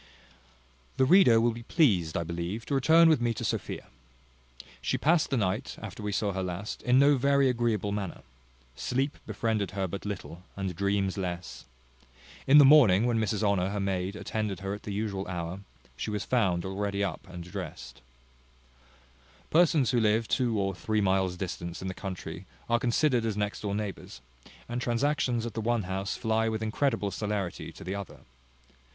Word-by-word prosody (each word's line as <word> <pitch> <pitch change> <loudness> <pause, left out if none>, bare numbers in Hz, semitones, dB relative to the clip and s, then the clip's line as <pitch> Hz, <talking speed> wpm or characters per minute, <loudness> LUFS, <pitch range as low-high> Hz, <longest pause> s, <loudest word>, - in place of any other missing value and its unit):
The 130 - +4
reader 135 -8 +6
will 120 +1 +3
be 115 +1 -8
pleased, 105 - +2
I 85 - -1
believe, 85 +7 -4
to - - -3
return 160 +5 +6
with 155 -6 +4
me 120 -1 0
to - - -4
Sophia. - - -3 1.0
She - - 0
passed 160 +1 +2
the 135 - 0
night, 105 +4 -1
after 105 -1 -8
we 105 0 -2
saw 100 0 0
her 95 - -2
last, 90 +3 -5
in 125 +1 +3
no 140 +1 +5
very 140 +1 +3
agreeable 115 -5 0
manner. 100 -4 -4 0.5
Sleep 130 - -2
befriended 110 -1 -1
her 95 -1 0
but 100 +3 -6
little, 95 -4 -6
and 95 -3 -3
dreams 100 +1 0
less. 90 -1 -5 0.8
In 140 +2 +7
the 145 - +9
morning, 120 -8 +7
when 120 -2 +1
Mrs 110 -1 -1
Honour, 100 -3 +2
her 100 +1 -3
maid, 95 0 -2
attended 105 -3 -3
her 95 0 -3
at 105 - -7
the 105 - -6
usual 100 -1 -3
hour, 90 0 -4 0.4
she 65 - -4
was 105 -1 -3
found 95 -8 +1
already 100 +1 -2
up 100 0 -4
and 90 -1 -7
drest. 90 - -8 1.5
Persons 155 -6 +4
who 125 - +2
live 110 0 +2
two 120 -4 +1
or 95 0 0
three 110 +4 -1
miles' 95 -2 +1
distance 85 -2 -5
in 95 - -5
the 95 - -3
country 90 -2 -7 0.2
are 120 0 +2
considered 125 +1 +2
as 110 -2 -2
next 105 0 -2
door 100 -1 -2
neighbours, 100 -11 -5 0.5
and 120 +1 -3
transactions 120 -1 0
at 120 - -5
the 115 - -3
one 115 -1 0
house 95 +2 -3
fly 110 0 +1
with 110 0 -3
incredible 110 -2 0
celerity 105 -4 -3
to - - -12
the 95 - -4
other. 100 -1 -7
105 Hz, 180 wpm, -28 LUFS, 95-120 Hz, 1.5 s, the